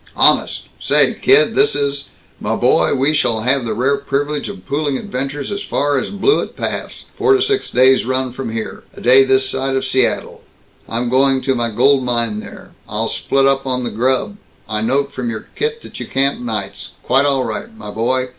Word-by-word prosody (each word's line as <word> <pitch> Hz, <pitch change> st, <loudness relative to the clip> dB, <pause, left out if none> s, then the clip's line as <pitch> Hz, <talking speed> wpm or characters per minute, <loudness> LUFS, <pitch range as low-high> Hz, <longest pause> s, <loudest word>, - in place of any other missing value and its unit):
"Honest? -, -, +3 dB, 0.2 s
Say, -, -, +3 dB
kid, 425 Hz, +3 st, +4 dB
this 420 Hz, +2 st, +3 dB
is 140 Hz, 0 st, -2 dB, 0.3 s
Muh -, -, -2 dB
boy, -, -, +2 dB
we 140 Hz, +3 st, +2 dB
shall 115 Hz, -8 st, +1 dB
have 130 Hz, +2 st, +2 dB
the 110 Hz, -2 st, -2 dB
rare 135 Hz, +5 st, +1 dB
privilege 145 Hz, +2 st, -2 dB
of 200 Hz, -1 st, -10 dB
pooling 145 Hz, -1 st, -1 dB
adventures 135 Hz, +5 st, -4 dB
as 200 Hz, 0 st, -3 dB
far 145 Hz, -7 st, 0 dB
as -, -, -4 dB
Blewett 205 Hz, -, 0 dB
Pass, -, -, -4 dB
four 410 Hz, -2 st, +3 dB
to 395 Hz, -, +1 dB
six 410 Hz, -1 st, 0 dB
days' 130 Hz, +1 st, +4 dB
run 130 Hz, +1 st, -1 dB
from 125 Hz, -2 st, -6 dB
here 110 Hz, -1 st, -5 dB, 0.2 s
a -, -, -8 dB
day 130 Hz, +2 st, +6 dB
this 130 Hz, 0 st, +2 dB
side 135 Hz, 0 st, -2 dB
of 135 Hz, 0 st, -1 dB
Seattle. 130 Hz, -2 st, 0 dB, 0.5 s
I'm 120 Hz, +2 st, -2 dB
going 135 Hz, +2 st, +3 dB
to 135 Hz, -, 0 dB
my 120 Hz, -2 st, -1 dB
gold 130 Hz, +4 st, +3 dB
mine 120 Hz, -3 st, -1 dB
there. -, -, -11 dB, 0.2 s
I'll -, -, -2 dB
split 135 Hz, 0 st, 0 dB
up 135 Hz, 0 st, +1 dB
on 125 Hz, -1 st, -1 dB
the 120 Hz, -, -3 dB
grub 130 Hz, -, 0 dB, 0.3 s
I 110 Hz, 0 st, -2 dB
note 140 Hz, +5 st, 0 dB
from 125 Hz, -2 st, -3 dB
your 110 Hz, -2 st, -6 dB
kit 460 Hz, +1 st, -3 dB
that -, -, -10 dB
you -, -, -6 dB
camp 135 Hz, +1 st, 0 dB
nights. 110 Hz, -5 st, -5 dB
Quite 135 Hz, +2 st, +2 dB
all 135 Hz, -2 st, +1 dB
right, 115 Hz, -, -4 dB
my 105 Hz, -, -8 dB
boy. 125 Hz, +4 st, -1 dB
135 Hz, 200 wpm, -17 LUFS, 125-140 Hz, 0.5 s, day